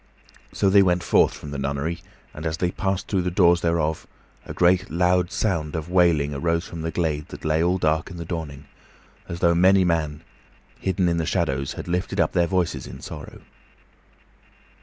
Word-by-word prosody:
So 95 - +1
they 100 0 +7
went 90 -2 +2
forth - - +3
from 75 - -9
the 70 - -4
nunnery, 70 +5 -2 0.3
and, 75 - -8
as 80 -1 -2
they 90 +1 0
passed 95 -1 -2
through 95 -3 0
the 90 - -1
doors 85 -1 +4
thereof, 80 -2 -1 0.4
a - - -6
great, 90 +2 +2
loud 90 +1 +2
sound 80 -8 -1
of 80 +2 -5
wailing 85 -6 +3
arose 85 +4 -1
from 85 - -7
the 80 - -2
glade 80 -3 -2
that - - -10
lay 80 +1 +2
all 90 +2 +2
dark 80 -1 0
in 90 - -9
the 85 - -6
dawning, 80 -5 -6 0.6
as 85 - -6
though 85 -1 +4
many 95 +2 +5
men, 80 -3 -1 0.6
hidden 95 -1 0
in 85 -1 +1
the 80 -1 -1
shadows, 70 -8 -1
had - - -8
lifted 90 +2 -2
up - - +2
their 85 -2 +2
voices 90 -1 -1
in 60 +2 -9
sorrow. - - -9
85 Hz, 190 wpm, -23 LUFS, 80-90 Hz, 0.6 s, they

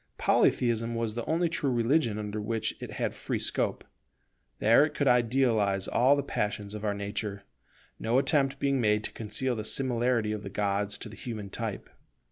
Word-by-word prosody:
Polytheism 115 -1 +2
was 115 -2 -2
the 120 +1 -3
only 170 +2 +1
religion 120 -2 +1
under 105 0 -4
which 110 +1 -2
it - - -6
had - - -2
free - - -3
scope: - - -1 0.7
there 115 +6 +5
it 150 -1 -2
could 140 - 0
idealize 115 -5 +2
all 130 +4 +4
the 140 - -1
passions 105 -4 -3
of 105 0 -6
our 105 -1 0
nature, 100 0 -4 0.6
no 115 +3 +1
attempt 140 0 +2
being 135 -1 +1
made 105 -1 +2
to - - -2
conceal 120 +4 -2
the 110 - -4
similarity 120 -3 +1
of 105 -1 -3
the 100 - -7
gods 105 0 -1
to - - -8
the 110 - -10
human 105 -3 -6
type. 110 -3 -4
115 Hz, 175 wpm, -29 LUFS, 105-130 Hz, 0.7 s, there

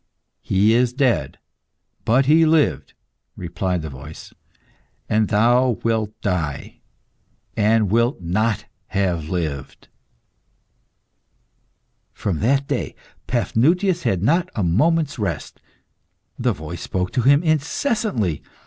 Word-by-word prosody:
"He 100 +4 +2
is 120 +1 +2
dead, 130 -3 0 0.7
but 130 +4 +3
he 155 +4 +5
lived," 160 -1 +1 0.4
replied 90 -1 -3
the 80 - -5
voice; 65 +4 -11 0.7
"and 110 0 +2
thou 120 +3 +3
wilt 110 -1 -1
die, 85 -8 -3 0.8
and 105 -1 +2
wilt 115 +2 +2
not 105 +6 -1 0.2
have 90 -5 -1
lived." 75 -7 -4 2.2
From 95 -6 -3
that 135 +5 +1
day, - - -3 0.3
Paphnutius 170 - +1
had 95 -1 0
not 170 - +2
a 105 - 0
moment's 145 - +1
rest. 95 -7 -4 0.8
The - - +2
voice 80 +3 -8
spoke 90 -1 -2
to 125 - 0
him 140 +5 +4
incessantly. 155 - 0
110 Hz, 105 wpm, -21 LUFS, 90-140 Hz, 2.2 s, he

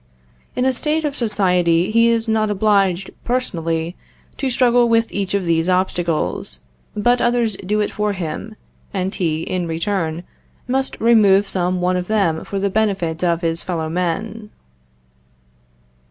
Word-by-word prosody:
In 250 - 0
a 260 - +3
state 310 +4 +1
of 285 -2 -2
society 180 -7 +2
he 230 +1 +4
is 230 0 +1
not 220 -1 +1
obliged, 195 -2 +1
personally, 170 -9 -2 0.4
to 270 - -1
struggle 245 -1 +3
with 230 0 +2
each 195 -1 -1
of 195 -2 -1
these 165 +1 +1
obstacles, 175 - -1 0.3
but 240 +4 +2
others 240 -3 +1
do 210 +3 -1
it 210 - -1
for 210 -1 -1
him; 190 +4 -5 0.4
and 190 +1 -1
he, 160 -5 -1
in 180 -2 -2
return, 165 -1 -2 0.4
must 265 +1 -1
remove 205 -4 +5
some 180 -1 -1
one 180 +1 +1
of 180 0 -3
them 195 -7 +1
for 200 - -5
the 200 0 0
benefit 190 -6 0
of 170 -1 +1
his 165 -1 0
fellow 165 -3 -3
men. 190 +6 -3
195 Hz, 150 wpm, -19 LUFS, 175-225 Hz, 0.4 s, remove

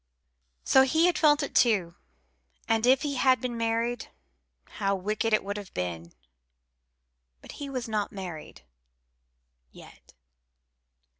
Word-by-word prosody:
So 265 - +5
he 315 +6 +3
had 355 - +2
felt 295 -2 +4
it - - -5
too; 195 -8 +2 0.7
and 225 +1 +1
if 265 +3 +4
he 285 -2 -2
had 255 0 +3
been 250 -2 -4
married, 230 +1 -1 0.6
how 200 -1 -2
wicked 210 +4 -2
it 215 - +2
would 200 +1 -4
have 205 -2 -9
been! 85 -2 -5 1.3
But - - -12
he 285 - -5
was 255 -3 -4
not 215 -2 -2
married 175 - -9 1.1
yet. - - -17
225 Hz, 130 wpm, -27 LUFS, 195-255 Hz, 1.3 s, So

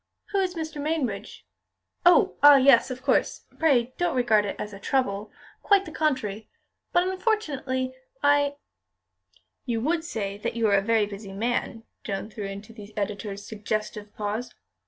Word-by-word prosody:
"Who 400 - +1
is 370 -2 0
Mr. 315 -2 -5
Mainbridge? 260 -10 -3 0.6
Oh, 380 +3 +5
ah! 290 0 +10
yes, 265 -3 +6
of 255 0 -6
course. - - +1
Pray 255 -6 +3
don't 350 -5 +1
regard 225 -4 +3
it 200 - -3
as 210 - -6
a 200 - -9
trouble. 210 -3 -1 0.3
Quite 400 -1 +4
the 315 - -8
contrary. 255 -10 -1 0.4
But 355 +1 +3
unfortunately, 295 - -1 0.3
I 285 0 +3 0.5
" - - -38
"You 235 -2 0
would 320 +5 0
say 205 -9 -4
you 230 -1 +2
are 200 - +4
a 195 - +4
very 220 +1 +2
busy 200 -1 -9
man," 230 +1 -2 0.2
Joan 200 +1 -4
threw 210 -1 -6
into 200 +3 -8
the 210 -1 -12
editor's 205 0 -4
suggestive 215 -1 -4
pause. 215 +4 -4
235 Hz, 155 wpm, -26 LUFS, 210-290 Hz, 0.6 s, ah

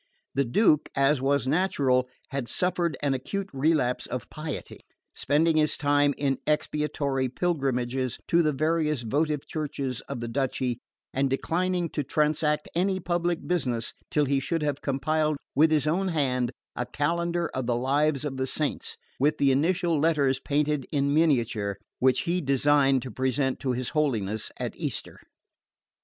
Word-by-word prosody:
The 140 0 +1
Duke, 150 - +3
as 140 0 +3
was 135 -1 +1
natural, 135 -6 +2 0.2
had 135 -3 -3
suffered 175 -3 0
an 140 -2 +2
acute 195 +10 -4
relapse 135 -3 +1
of 125 -1 -5
piety, 155 0 -6 0.3
spending 155 +3 +2
his 155 -1 +2
time 145 -1 +2
in 135 -2 0
expiatory 145 -3 0
pilgrimages 130 -5 -1
to 170 - +4
the 155 -2 +2
various 155 -2 0
votive 150 +4 0
churches 140 -5 -3
of 140 -3 -4
the 120 - -4
duchy, 125 -1 -1 0.3
and 135 +1 +1
declining 175 +6 0
to 150 - -2
transact 150 +1 +1
any 185 +2 +1
public 175 -1 -1
business 125 -10 -1 0.2
till 150 -1 +2
he 140 0 +1
should 160 +4 -2
have 145 -2 -1
compiled 155 +2 0 0.2
with 155 +3 +5
his 155 -2 +2
own 180 +5 +1
hand 130 -7 0 0.2
a 125 - -3
calendar 170 +3 -1
of 130 -2 -3
the 120 - +2
lives 140 +3 +1
of 135 -2 -3
the 130 0 -1
saints, 150 +2 -2 0.2
with 150 +3 +2
the 140 -1 +4
initial 170 +3 +2
letters 140 -4 +2
painted 150 -1 0
in 140 -1 +1
miniature, 120 -10 +1 0.2
which 130 0 +3
he 180 +1 0
designed 135 -1 +3
to 130 - -6
present 130 +2 0
to 130 -2 -1
his 125 0 -2
Holiness 110 -9 -1
at - - -3
Easter. - - -5
145 Hz, 155 wpm, -27 LUFS, 130-155 Hz, 0.3 s, with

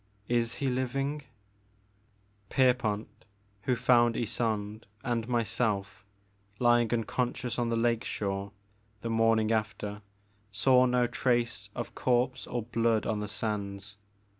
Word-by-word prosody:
Is 120 -1 +1
he 140 - -2
living? 135 +3 -1 1.2
Pierpont, 125 -5 +2 0.6
who 125 - +2
found 120 -1 +4
Ysonde 110 -2 -2 0.2
and 120 -2 -1
myself 110 -4 -1 0.5
lying 120 -1 +3
unconscious 120 +1 -1
on 120 -1 0
the 115 - +1
lake 115 0 +1
shore, 100 0 -3 0.5
the 115 - -3
morning 115 -1 +3
after, 105 -1 -2 0.5
saw 125 +5 +4
no 125 0 +3
trace 120 -5 0
of 120 - -5
corpse 125 +1 0
or 120 -2 -2
blood 115 -1 +1
on 110 -2 -1
the 105 - -3
sands. 105 -1 -4
115 Hz, 115 wpm, -30 LUFS, 105-125 Hz, 1.2 s, found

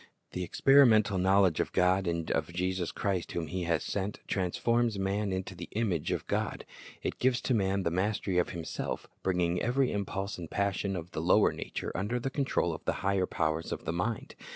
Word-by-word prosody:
The 90 - -4
experimental 110 -3 +5
knowledge 95 -3 +4
of - - -1
God 90 +1 +3
and 85 -1 -1
of - - -1
Jesus 90 0 -1
Christ 95 -4 -2
whom 85 - -2
He 90 +3 -3
has 85 -1 +1
sent, 100 +1 -3
transforms 115 +4 +1
man 100 +1 -1
into 95 0 -3
the 85 0 -8
image 100 -8 0
of - - -2
God. - - -2 0.4
It - - -3
gives 130 0 +3
to 130 - 0
man 100 -3 +1
the 85 - 0
mastery 95 0 0
of 90 - +1
himself, 85 -2 -4 0.2
bringing 90 -1 +1
every 125 +2 +2
impulse 100 -1 -3
and 85 -2 -7
passion 100 0 -1
of 90 0 -6
the 80 - -3
lower 90 +5 +4
nature - - -5
under 105 +6 -1
the 135 +2 -3
control 140 0 0
of - - -8
the - - +1
higher 95 -1 +2
powers 80 0 -1
of - - -4
the 80 - -1
mind. 105 +6 -2
95 Hz, 195 wpm, -30 LUFS, 90-105 Hz, 0.4 s, experimental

